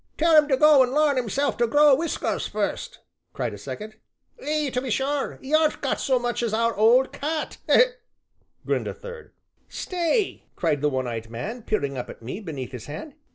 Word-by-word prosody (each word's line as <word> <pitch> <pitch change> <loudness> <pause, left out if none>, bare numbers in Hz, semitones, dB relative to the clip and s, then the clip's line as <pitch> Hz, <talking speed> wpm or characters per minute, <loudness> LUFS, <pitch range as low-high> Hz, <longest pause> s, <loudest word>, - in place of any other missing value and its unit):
"Tell 330 0 +4
'un 300 -1 +6
to 265 -3 +2
go 300 -1 +7
an' 255 0 +2
larn 295 -2 +3
hisself 275 +6 -1
to 235 - +2
grow 290 +4 +6
whiskers 320 +5 -1
fust!" - - -3 0.4
cried - - -3
a - - -7
second. 215 +1 -8 0.4
"Ay, 300 -2 -1
to 250 - 0
be 260 - -5
sure, 270 +5 -1
'e 270 +3 -5
aren't 310 -1 +3
got - - -1
so 260 -3 +2
much 240 0 -2
as 225 -2 0
our 230 +1 +1
old 235 +5 +4
cat!" 310 +2 -3 1.1
grinned - - -1
a - - -5
third. 480 -1 -10 0.4
"Stay!" 365 +3 -1
cried 145 - 0
the 150 - +2
one 130 -2 -2
eyed 115 -2 -5
man, 205 - -5
peering 140 - -2
up 125 - -6
at - - -11
me 130 - -5
beneath 150 - -6
his 125 -4 -8
hand. 155 - -7
255 Hz, 195 wpm, -24 LUFS, 205-300 Hz, 1.1 s, go